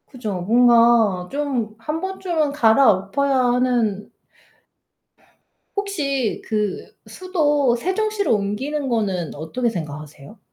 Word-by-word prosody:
그죠. 215 Hz, -9 st, -5 dB
뭔가 230 Hz, -3 st, +4 dB
좀 265 Hz, -7 st, -2 dB
1 305 Hz, +7 st, -4 dB
번쯤은 355 Hz, -6 st, -2 dB
갈아엎어야 240 Hz, 0 st, +3 dB
하는 245 Hz, -5 st, 0 dB, 1.6 s
혹시 285 Hz, -, -2 dB
그 210 Hz, -3 st, -3 dB, 0.2 s
수도 295 Hz, -9 st, +1 dB
세종시로 405 Hz, -, -1 dB
옮기는 265 Hz, +8 st, -3 dB
거는 195 Hz, -8 st, -1 dB
어떻게 165 Hz, +12 st, -2 dB
생각하세요? 150 Hz, 0 st, -8 dB
240 Hz, 210 characters per minute, -21 LUFS, 205-290 Hz, 1.6 s, 뭔가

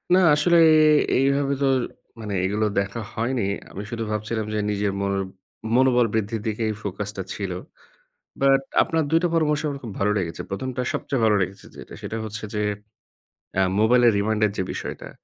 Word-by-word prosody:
না -, -, +6 dB, 0.2 s
আসলে 170 Hz, +3 st, +3 dB, 0.6 s
এ -, -, +4 dB
এইভাবে 140 Hz, +1 st, +2 dB
তো -, -, +3 dB, 0.5 s
মানে 105 Hz, -2 st, -5 dB
এগুলো 105 Hz, +3 st, 0 dB
দেখা 100 Hz, +4 st, -3 dB
হয়নি। 120 Hz, +1 st, -1 dB, 0.3 s
আমি 100 Hz, -, -6 dB
শুধু 115 Hz, -1 st, -3 dB
ভাবছিলাম 110 Hz, +1 st, -2 dB
যে 105 Hz, -, 0 dB
নিজের 100 Hz, 0 st, 0 dB
মন 100 Hz, 0 st, 0 dB, 0.6 s
মনোবল 125 Hz, -1 st, +4 dB
বৃদ্ধির 110 Hz, 0 st, -1 dB
দিকে 110 Hz, +1 st, -2 dB
এই -, -, -1 dB
focus 100 Hz, +1 st, -4 dB
টা 95 Hz, -, -2 dB
ছিল। 100 Hz, -3 st, -4 dB, 0.9 s
But 135 Hz, 0 st, +5 dB, 0.2 s
আপনার 165 Hz, -1 st, +1 dB
২ 165 Hz, +2 st, +4 dB
টা -, -, +4 dB
পরামর্শ 150 Hz, -2 st, +2 dB
আমার 140 Hz, -1 st, -4 dB
খুব 115 Hz, -, -6 dB
ভালো 105 Hz, +1 st, +2 dB
লেগেছে। 85 Hz, -3 st, -3 dB
১ম 130 Hz, +7 st, -3 dB
টা -, -, +1 dB
সবচেয়ে 135 Hz, -4 st, -2 dB
ভালো 105 Hz, -1 st, +4 dB
লেগেছে 95 Hz, +2 st, -4 dB
যেটা -, -, -11 dB
সেটা 115 Hz, -, -4 dB
হচ্ছে 110 Hz, 0 st, -6 dB
যে, 105 Hz, -, -1 dB, 0.9 s
এ্যা 95 Hz, -, +2 dB, 0.2 s
মোবাইলের 120 Hz, +1 st, +5 dB
reminder 105 Hz, +1 st, +1 dB
যে -, -, 0 dB
বিষয়টা, -, -, -6 dB
110 Hz, 175 wpm, -24 LUFS, 105-130 Hz, 0.9 s, না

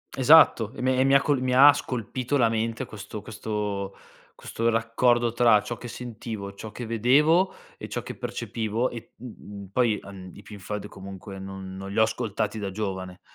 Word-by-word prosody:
Esatto, 135 Hz, -5 st, +6 dB
e -, -, -7 dB
me 130 Hz, 0 st, +2 dB
e -, -, +5 dB
mi 135 Hz, -, +4 dB
ha 140 Hz, -, +6 dB
co 145 Hz, -, +2 dB
mi 125 Hz, -2 st, 0 dB
ha 140 Hz, +2 st, +9 dB
scolpito 130 Hz, +1 st, -3 dB
la 120 Hz, -, +4 dB
mente 115 Hz, +3 st, -2 dB
questo 105 Hz, -1 st, -9 dB
questo 105 Hz, -2 st, -4 dB, 0.4 s
questo 115 Hz, +1 st, -2 dB
raccordo 115 Hz, +1 st, +2 dB
tra 115 Hz, -3 st, +5 dB
ciò 120 Hz, -, -4 dB
che 120 Hz, -, -8 dB
sentivo, 110 Hz, -4 st, -7 dB
ciò 105 Hz, +2 st, -9 dB
che 120 Hz, +3 st, -7 dB
vedevo 145 Hz, -, +3 dB, 0.3 s
e -, -, -6 dB
ciò -, -, -4 dB
che -, -, -7 dB
percepivo 115 Hz, +2 st, -2 dB
e, 115 Hz, -2 st, -10 dB
mhmm, 105 Hz, -4 st, -10 dB
poi, 115 Hz, -2 st, +2 dB
ehm, 95 Hz, -2 st, -11 dB
i -, -, -12 dB
Pink 105 Hz, -2 st, -11 dB
Floyd 105 Hz, +1 st, -5 dB
comunque 95 Hz, 0 st, -9 dB
non 95 Hz, -1 st, -8 dB
non 95 Hz, 0 st, -7 dB
li -, -, -6 dB
ho 110 Hz, -, +6 dB
ascoltati 110 Hz, -1 st, -2 dB
da 100 Hz, -2 st, -3 dB
giovane. 95 Hz, -2 st, -5 dB
110 Hz, 190 wpm, -26 LUFS, 100-125 Hz, 0.4 s, ha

